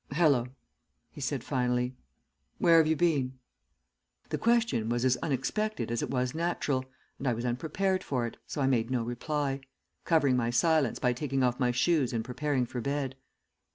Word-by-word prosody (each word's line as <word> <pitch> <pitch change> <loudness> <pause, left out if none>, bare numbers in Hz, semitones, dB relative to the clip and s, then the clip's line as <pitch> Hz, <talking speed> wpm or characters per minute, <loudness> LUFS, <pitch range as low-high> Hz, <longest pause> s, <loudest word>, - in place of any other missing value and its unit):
"'Hallo,' 140 -6 +3 0.6
he - - -10
said 135 -2 -2
finally. 125 -1 0 0.6
'Where 170 -1 +5
have 160 - +4
you 160 - +3
been?' 140 -7 +1 0.9
"The - - -2
question 230 - +2
was 120 +1 0
as 130 -1 +4
unexpected 190 - -2
as 120 - -1
it - - -3
was 125 -1 -1
natural, 155 -5 -1 0.3
and 135 - -3
I 125 - +3
was 120 +2 -4
unprepared 185 +10 0
for 125 -4 -1
it, 115 - -6
so 145 - -3
I - - +3
made 120 -3 +2
no 125 -3 0
reply, 135 +3 -2 0.4
covering 145 -6 +3
my 120 -2 +1
silence 150 +2 +2
by 125 -1 +1
taking 135 +1 -1
off 125 0 +1
my 125 -2 +2
shoes 130 +2 +2
and 115 -1 -1
preparing 130 +1 -1
for 120 0 -5
bed. 140 0 -2
130 Hz, 175 wpm, -29 LUFS, 125-155 Hz, 0.9 s, Where